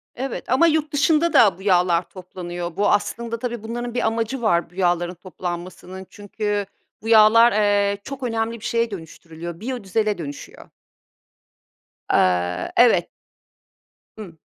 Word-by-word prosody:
Evet, 265 -2 -5
ama 270 +7 +4
yurt 305 -2 0
dışında 315 +3 +2
da 195 -6 +5
bu 190 - -14
yağlar 180 -3 +2
toplanıyor, 175 -2 -7
bu 205 - +1
aslında 230 +3 -1
tabii, 240 -2 -5
bunların 240 +1 -5
bir 245 - 0
amacı 230 +3 -2
var, 175 -7 +1
bu 175 - -23
yağların 175 -1 0
toplanmasının, 180 +1 -7
çünkü 205 0 -3 0.4
bu 220 - -8
yağlar, 230 +1 +7
eee, 205 -1 +2
çok 275 -1 -8
önemli 230 -1 -2
bir - - -10
şeye 230 -1 0
dönüştürülüyor, 165 -1 -9
biyodizele 215 -3 -2
dönüşüyor. 145 -4 -9 1.4
Eee, 90 -1 +1
evet. - - +4 1.1
Hı. 180 -7 -10
205 Hz, 130 wpm, -22 LUFS, 175-230 Hz, 1.4 s, yağlar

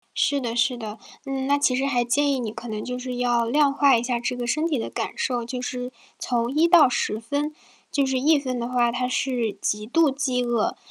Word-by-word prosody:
是 285 -1 +1
的 235 -1 -3
是 245 +1 +2
的。 220 -2 -7 0.3
嗯， 270 -1 -3
那 285 +1 +3
其 265 -3 +2
实 270 +1 0
还 245 -3 +1
建 280 +4 +2
议 260 - -1
你 220 -3 -4
可 240 - -8
能 215 -1 -4
就 250 0 -4
是 250 -1 -5
要 240 -1 +1
量 285 +3 +3
化 275 -3 +4
一 230 - 0
下 245 -1 -1
这 250 +1 -3
个 240 -1 -3
身 310 +6 0
体 295 -6 0
的 - - -4
感 225 - -3
受， 245 -2 -1
就 250 +1 -5
是 250 0 -4 0.3
从 240 +1 -1
1 320 +2 +4
到 335 -6 +7
10 220 -3 -1
分， 290 +6 -2 0.4
就 280 -1 +1
是 265 -1 0
1 300 +3 +4
分 255 -3 -3
的 235 +1 -3
话， 240 -1 +2
它 250 +1 -1
是 245 -4 -1
极 210 +1 -2
度 315 +3 +3
饥 265 -3 -1
饿。 240 -3 0
250 Hz, 240 characters per minute, -24 LUFS, 240-275 Hz, 0.4 s, 到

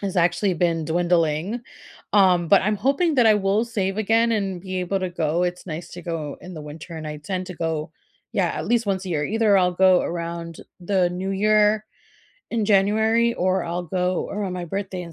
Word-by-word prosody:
has 195 -2 -3
actually 175 +2 +2
been 165 -2 0
dwindling, 170 +5 0 0.5
um, 185 -4 +4
but 200 - +6
I'm 210 +1 +1
hoping 280 - +1
that 245 -3 +5
I 215 - +6
will 205 +2 +1
save 200 -4 -2
again, 225 +2 +2
and 195 -5 -2
be 185 0 -4
able 190 +2 -1
to 185 - -2
go. 165 0 0
It's 180 +1 -4
nice 165 0 -6
to 175 - -9
go 160 -4 -4
in 180 0 -10
the 155 - -7
winter, 160 +3 -9
and 155 - -6
I 150 - -5
tend 185 +4 -4
to 180 - -7
go 160 -2 -3 0.4
yeah, 185 -3 +2
at 160 - -4
least 235 0 +1
once 190 -1 -1
a 185 - -5
year. 150 -3 0
Either 215 -2 +3
I'll 180 -1 +2
go 185 0 +5
around 170 -1 -5 0.2
the 180 -1 +1
new 185 +2 -4
year 210 +1 +3 0.7
in 225 -3 0
January, 220 +3 +3
or 185 -1 0
I'll 175 +1 -3
go 180 +1 -1
around 200 -3 -3
my 180 -1 -4
birthday 190 +1 -4
in 170 -1 -10
185 Hz, 205 wpm, -23 LUFS, 170-205 Hz, 0.7 s, but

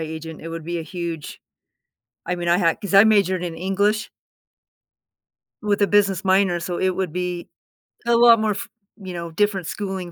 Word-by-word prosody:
agent, 160 0 -7
it 165 - -7
would 165 -1 -6
be 170 +1 -3
a 165 - -4
huge. 170 -3 -6 0.9
I 180 - -1
mean, 175 -1 -4
I 175 +1 +4
had 170 -4 +1
'cause 200 -1 -5
I 195 +2 +9
majored 200 -4 +3
in 170 -2 -4
English 200 +4 0 1.5
with 205 -1 0
a 205 - +4
business 200 -3 +2
minor, 190 -2 +3
so 175 +1 -4
it 185 - +2
would 185 -3 -3
be 180 -1 -4 0.6
a 235 - +4
lot 235 -1 +7
more 215 0 +1
f 200 - -4 0.3
you 190 -4 -8
know, 170 -1 -5
different 195 0 0
schooling 190 -3 -5
185 Hz, 185 wpm, -22 LUFS, 170-200 Hz, 1.5 s, I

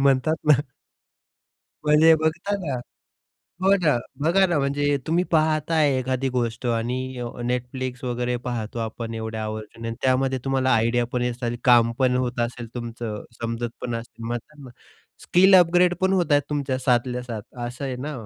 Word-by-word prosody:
म्हणतात 140 +3 +3
ना? 140 -2 +6 1.3
म्हणजे 150 +2 +6
बघा 160 +6 -1
ना 165 -8 -4 0.9
हो 195 +1 +5
ना. 150 -6 +4 0.3
बघा 185 +4 +4
ना 170 -4 +1
म्हणजे 145 +1 +1
तुम्ही 170 +3 +2
पाहत 155 -1 +2
आहे 150 -4 +3
एखादी 130 +1 -1
गोष्ट 120 0 -2
आणि 120 +1 0 0.2
अ, - - -3 0.3
Netflix 125 +1 -3
वगैरे 125 0 -1
पाहतो 115 -2 -3
आपण 115 +1 -4
एवढे 110 0 -4
आवर्जून. 110 +1 -5
त्यामध्ये 130 0 +2
तुम्हाला 135 -1 +1
आयडिया 115 +2 +2
पण 125 - 0
येतं, 120 -1 -2
काम 120 -2 +5
पण 130 -2 +3
होत 125 -1 -1
असेल 120 0 -8
तुमचं, 115 -3 -5 0.2
समजत 115 0 -3
पण 120 -2 -3
असेल, 115 0 -7
म्हणतात 120 +6 -5
ना 140 - -11
मग 125 - -11 0.5
स्किल 190 +2 +5
अपग्रेड 180 0 +4
पण 190 0 +2
होत 180 -5 +1
आहेत 145 0 +5
तुमच्या 140 -3 -1
साथल्या-साथ 125 -3 -1 0.2
असं 125 +4 -6
आहे 130 -2 -3
ना? 145 +5 -5
130 Hz, 160 wpm, -24 LUFS, 120-150 Hz, 1.3 s, ना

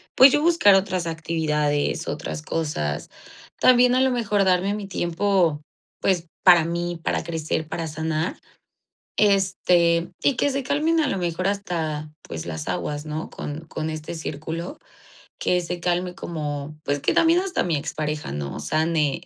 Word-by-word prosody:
pues 265 +1 +9
yo 295 - +2
buscar 330 - +5
otras 185 -2 0
actividades, 150 -3 -1
otras 75 -1 -4
cosas. 75 - -3 0.5
También 250 0 +6
a 255 - +3
lo 265 - +4
mejor 210 -5 +1
darme 190 +1 +2
mi 205 -1 -5
tiempo, 175 -3 +1 0.4
pues, 175 -3 +1 0.2
para 175 -3 +7
mí, 170 0 -3
para - - 0
crecer, 160 -1 -2
para 165 +1 -4
sanar. 160 +1 -2 0.8
Este, 180 -4 +3
y 280 - +3
que - - +2
se 275 0 -1
calmen 310 +5 +1
a 300 - +1
lo 195 - -1
mejor 175 +1 -1
hasta, 160 -7 -3
pues 80 0 -7
las 80 -3 -5
aguas, 145 +11 -3
¿no? 155 +1 -4
Con 145 +2 -6
con 155 0 -4
este 155 +1 -6
círculo, 160 - -5 0.6
que 180 0 +1
se 175 +1 -4
calme 180 +1 -1
como 150 -4 -5
pues 145 -1 -1
que - - +1
también 330 +2 +4
hasta 380 0 -1
mi 170 -3 0
expareja, 150 - -3
¿no?, 70 0 -4
sane. 155 - 0
170 Hz, 155 wpm, -24 LUFS, 155-195 Hz, 0.8 s, pues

